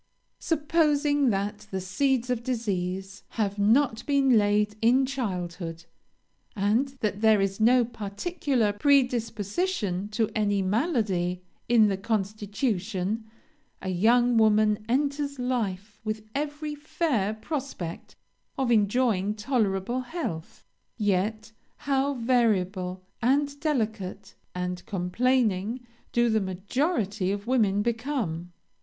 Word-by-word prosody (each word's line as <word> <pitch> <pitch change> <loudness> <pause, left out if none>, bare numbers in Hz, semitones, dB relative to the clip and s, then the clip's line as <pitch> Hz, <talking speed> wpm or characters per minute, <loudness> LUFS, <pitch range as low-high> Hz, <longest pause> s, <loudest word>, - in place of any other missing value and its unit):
"Supposing 295 -3 +2
that 205 +1 -2
the 190 - -3
seeds 250 +6 0
of 240 -2 -1
disease 195 -6 -3 0.2
have 205 -2 0
not 225 +3 +3
been 275 -3 +4
laid 210 0 +2
in 250 +4 +4
childhood, 175 -10 -4 0.7
and 215 +6 +2
that 210 -1 -1
there 220 -2 +5
is 195 +1 -1
no 240 +2 +5
particular 230 - -1
predisposition 230 - +1
to 215 +1 0
any 205 -2 +1
malady 190 - 0 0.3
in 235 -3 +6
the 195 -2 0
constitution, 210 0 -2 0.5
a 190 - -5
young 235 +6 +3
woman 215 -1 +3
enters 280 +2 0
life 215 -5 -3
with 215 0 -3
every 295 +1 -3
fair 295 - -1
prospect 235 - -5 0.4
of 260 -3 +1
enjoying 210 -2 +2
tolerable 215 -1 0
health; 245 - -6 0.3
yet, 215 +1 0 0.3
how 275 0 0
variable, 195 -7 +1 0.2
and 280 +3 +1
delicate, 220 - -2 0.2
and 180 0 -3
complaining, 215 +3 +1 0.3
do 240 0 +3
the 220 -1 +2
majority 200 - -1
of 200 0 -4
women 210 -5 +2
become! 225 - -2
220 Hz, 105 wpm, -27 LUFS, 195-255 Hz, 0.7 s, in